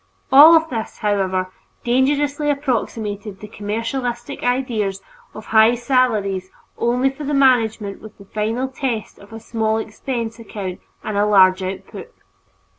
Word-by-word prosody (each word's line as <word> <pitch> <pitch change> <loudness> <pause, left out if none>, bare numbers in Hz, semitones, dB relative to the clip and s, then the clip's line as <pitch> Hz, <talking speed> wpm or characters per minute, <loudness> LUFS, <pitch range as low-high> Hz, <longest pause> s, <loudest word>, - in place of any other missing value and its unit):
All 310 +5 +9
this, 225 -6 -5
however, 190 -3 -1 0.3
dangerously 285 +4 +1
approximated 220 -7 -2
the 210 - -9
commercialistic 235 +5 -4
ideal 245 -5 0 0.4
of 215 - -9
high 220 +2 +5
salaries 220 -7 0 0.3
only 250 +3 +1
for 275 +3 -9
the 290 0 -1
management 225 -7 +2
with 215 0 -13
the 200 - -14
final 220 +6 -2
test 260 -4 -4
of 200 - -16
a 225 - -8
small 220 -1 -1
expense 230 +1 -4
account 200 -5 -6 0.2
and 210 -2 -3
a 205 - +3
large 190 -2 +5
output. 190 +1 -7
225 Hz, 130 wpm, -20 LUFS, 205-255 Hz, 0.4 s, All